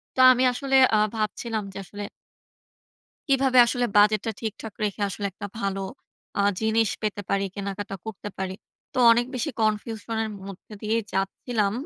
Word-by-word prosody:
তো - - -5
আমি 255 +1 +3
আসলে 270 +1 -1 0.2
আ - - +5 0.2
ভাবছিলাম 220 0 -2
যে - - -8
আসলে 205 +2 -7 1.3
কিভাবে 265 -1 +4
আসলে 245 0 0
বাজেটটা 210 +2 +4
ঠিকঠাক 220 -1 -5
রেখে 205 0 -2
আসলে 200 +1 -3
একটা 205 +2 -7
ভালো 195 0 -1 0.6
আ - - +4 0.2
জিনিস 220 0 +2
পেতে 205 -1 -2
পারি, 200 0 +2
কেনাকাটা 200 -1 -4
করতে 215 -1 -6
পারি। 190 -1 -3 0.4
তো - - -3
অনেক 240 +1 +4
বেশি 295 +5 -1
কনফিউশনের 220 +1 -1 0.2
মধ্যে 195 +2 -10
দিয়ে 220 +2 +1
যাচ্ছিলাম। 200 +2 0
215 Hz, 145 wpm, -25 LUFS, 200-230 Hz, 1.3 s, আ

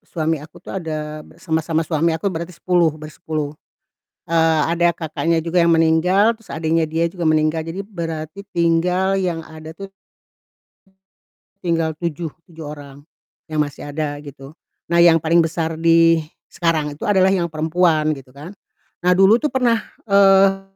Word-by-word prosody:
suami 160 -2 -1
aku 155 +1 -14
tuh - - -10
ada 155 -2 -5
b 155 - -16
sama 160 -2 -1
sama 160 0 -1
suami 160 +1 0
aku 195 +2 -2
berarti 170 +1 -6
10 175 -2 +2
bersepuluh, 155 -1 -5 0.7
eee, 160 -1 +2
ada 170 0 +3
kakaknya 165 0 -1
juga 170 +2 +1
yang 170 - +3
meninggal, 165 +6 +3
terus 225 -3 -21
adiknya 160 0 0
dia 165 +2 0
juga 170 -1 -1
meninggal, 155 +1 +1
jadi 165 +5 -6
berarti 165 -2 -6
tinggal 180 +2 +1
yang 170 -3 -2
ada 155 0 -11
tuh 195 0 -9 1.7
tinggal 165 -2 0
7, 170 -1 -4 0.2
7 165 -1 -13
orang, 145 -2 -9 0.5
yang 155 - -4
masih 145 -1 -3
ada 145 0 -4
gitu, 140 0 -12 0.3
nah 170 0 +2
yang 170 -1 +7
paling 165 +2 +3
besar 165 0 -2
di, 165 0 +5 0.2
sekarang 160 -4 -1
itu 145 - -17
adalah 190 -2 +3
yang 175 -3 0
perempuan 155 0 +1
gitu 135 -3 -12
kan, 145 +8 -11 0.5
nah 180 0 +3
dulu 195 +5 +5
tuh 300 - 0
pernah, 240 -4 +1 0.2
eee, 195 -1 +5
165 Hz, 155 wpm, -20 LUFS, 155-175 Hz, 1.7 s, yang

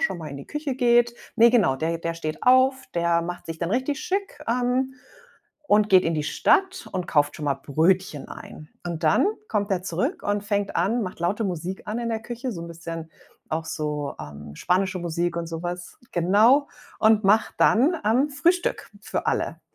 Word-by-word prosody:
schon 190 - 0
mal 160 -2 -7
in 140 - -7
die 140 - -10
Küche 300 -2 -3
geht 240 -1 +3 0.2
ne, 235 +1 +7
genau, 210 - +3
der 165 +4 -1
der 165 0 -3
steht 155 -2 -4
auf, 260 +1 +5 0.2
der 170 0 +2
macht 175 +1 -6
sich 165 -1 -6
dann 170 +1 -2
richtig 260 +5 -1
schick, 395 +1 -3
ähm, 250 +2 0 0.7
und 210 0 +4
geht 185 -1 +6
in 165 - 0
die 155 - -1
Stadt 380 - +1
und 180 -2 -3
kauft 145 -1 +1
schon 155 - -6
mal 140 - +2
Brötchen 160 +3 0
ein. 155 - -10 0.2
Und 170 -1 -4
dann 155 - +4 0.2
kommt 205 -1 -1
er 185 -2 0
zurück 260 - -2
und 205 0 -1
fängt 205 -1 -1
an, 215 +8 +1
macht 185 -3 -6
laute 195 +6 0
Musik 180 0 -4
an 215 +2 -3
in 235 -1 -2
der 225 -1 -2
Küche, 240 +2 -5
so 170 -5 -6
'n - - -7
bisschen 165 -1 -7 0.4
auch 160 +1 -1
so, 150 -2 -3
ähm, 75 0 -9
spanische 185 +1 0
Musik 170 0 -2
und 170 0 -2
sowas. 175 +2 -6
Genau. 215 - +4 0.3
Und 220 -1 +4
macht 210 +3 +3
dann, 270 +10 +4
ähm, 250 +8 +2
Frühstück 345 +6 0
für - - -3
alle. - - -1
185 Hz, 190 wpm, -24 LUFS, 165-240 Hz, 0.7 s, ne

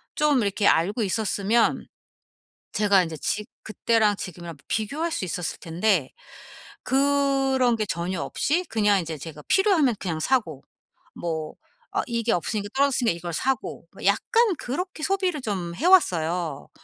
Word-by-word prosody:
쫌 295 -4 +3
이렇게 200 -1 0
알고 200 +8 +2
있었으면 215 +2 +1 0.9
제가 200 -3 +4
인제 165 -2 -5
지 210 +7 -2 0.2
그때랑 215 -1 +1
지금이랑 170 -3 -7
비교할 285 +11 -2
수 - - -2
있었을 175 -1 -4
텐데 170 -3 0 0.7
그런 270 -2 +2
게 215 - -1
전혀 175 -2 -3
없이 305 - 0
그냥 210 -3 +3
인제 165 -3 -5
제가 150 +1 -9
필요하면 365 - +3
그냥 165 -4 -3
사고 165 - 0 0.5
뭐 160 -2 -4 0.4
아 - - +1
이게 235 -1 -1
없으니까 205 +4 -2
떨어졌으니까 270 -6 +2
이걸 170 0 -6
사고 265 +9 -2
뭐 - - -8
약간 460 -5 +3
그렇게 310 +5 -4
소비를 375 -5 0
좀 185 -7 -3
해 290 - -4
왔어요. 170 - +2
215 Hz, 300 characters per minute, -25 LUFS, 175-270 Hz, 0.9 s, 제가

